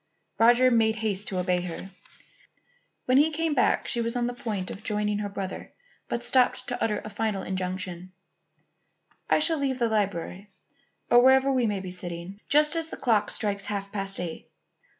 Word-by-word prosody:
Roger 240 +3 +6
made 225 -2 +3
haste 210 -3 -2
to 190 - -3
obey 180 0 +1
her. 180 +2 -7 1.1
When 255 +2 +4
he 300 +2 +4
came 320 0 -1
back 255 - +2
she 235 - 0
was 230 +1 -2
on 245 -1 0
the 245 - -2
point 210 -6 -4
of 195 - -8
joining 210 -1 -1
her 205 -1 -3
brother 195 -1 -6 0.3
but 235 - -2
stopped 250 +1 +2
to 245 - -2
utter 210 -2 -1
a - - -5
final 210 -1 -2
injunction: 185 -1 -4 1.2
"I - - +5
shall 320 0 +2
leave 270 -2 -1
the 235 -2 +1
library, 200 -2 -2 0.6
or 240 0 +8
wherever 265 +1 +5
we 255 -3 +2
may 205 -2 -2
be 185 -1 -7
sitting, 180 +2 -7
just 300 +2 +4
as 325 -1 -1
the - - -7
clock 215 -4 +2
strikes 200 -2 -1
half 200 -1 -4
past 195 -1 -2
eight. 170 -2 -6
210 Hz, 180 wpm, -26 LUFS, 195-245 Hz, 1.2 s, or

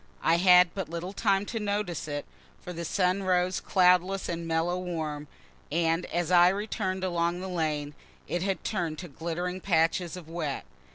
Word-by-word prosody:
I 165 - +4
had 180 -1 +6
but 190 -6 -4
little 170 +3 -5
time 200 -1 +1
to 225 +2 -4
notice 205 -6 -2
it, 145 -1 -4 0.3
for 180 - -8
the 170 0 -5
sun 185 +2 +1
rose 185 -1 +1
cloudless 185 +1 +3
and 170 0 -3
mellow 165 +2 0
warm, 155 -5 -4 0.4
and 165 +2 +1
as 175 0 -1
I 175 0 +7
returned 195 -1 -2
along 175 -1 0
the 190 - -5
lane 155 -5 -2 0.3
it 175 - -2
had 190 -2 -1
turn'd 170 -7 -2
to 175 - -7
glittering 175 +4 -4
patches 170 0 +1
of 175 -3 -10
wet. 160 -4 -4
175 Hz, 170 wpm, -28 LUFS, 165-185 Hz, 0.4 s, I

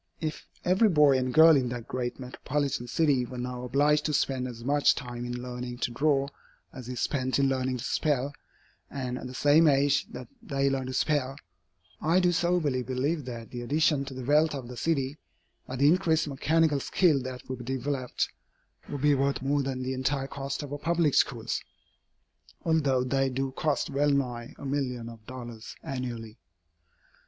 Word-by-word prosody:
If 155 -1 -4 0.2
every 190 +5 +4
boy 150 -5 +5
and 130 0 -1
girl 160 +3 +8
in 130 -3 +1
that 120 -1 -6
great 125 0 -3
metropolitan 130 0 -2
city 140 -1 +2
were 125 +1 -7
now 125 0 -4
obliged 145 +4 +2
to 150 - 0
spend 130 -2 0
as 115 -2 -8
much 145 +3 +3
time 120 -2 -6
in 120 0 -4
learning 125 0 -5
to 120 - -2
draw 140 +2 +2 0.5
as 125 -2 -8
is 125 -2 -4
spent 130 +1 0
in 140 0 +3
learning 130 -1 0
to 120 - -6
spell, 145 -1 0 0.6
and 125 -2 -4
at - - -7
the 130 - -9
same 150 +4 +5
age 140 0 +3
that 125 - -8
they 140 0 0
learn 135 -1 -2
to 130 - -4
spell, 135 -2 0 0.7
I 165 +4 +3
do 180 -1 +3
soberly 170 -6 +1
believe 130 +4 -1
that 115 -3 -7
the 120 - -5
addition 145 +2 +2
to 135 -1 -8
the 130 -1 -6
wealth 150 +2 +3
of 130 -3 -6
the 125 - -7
city, 140 +1 -1 0.5
by 130 - -5
the 140 +2 +4
increased 165 -2 +3
mechanical 150 +1 +2
skill 155 -1 +2
that 130 -1 -7
would 130 -1 -5
be 125 - -8
developed, 130 0 -2 0.6
would 145 - -4
be 150 0 +4
worth 140 -1 0
more 140 +1 +1
than 130 -1 -3
the 130 +1 -2
entire 135 +1 -1
cost 140 +1 -4
of 145 - -8
her 145 - -4
public 165 -2 +1
schools, - - +1 1.0
although 145 -6 +2
they 135 +1 +1
do 135 +1 -2
cost 145 +1 -1
well 145 +2 +2
nigh 125 -3 -1
a - - -9
million 130 -4 -2
of 115 -2 -13
dollars 120 -3 -8
annually. 120 -6 -5
135 Hz, 185 wpm, -28 LUFS, 125-145 Hz, 1.0 s, girl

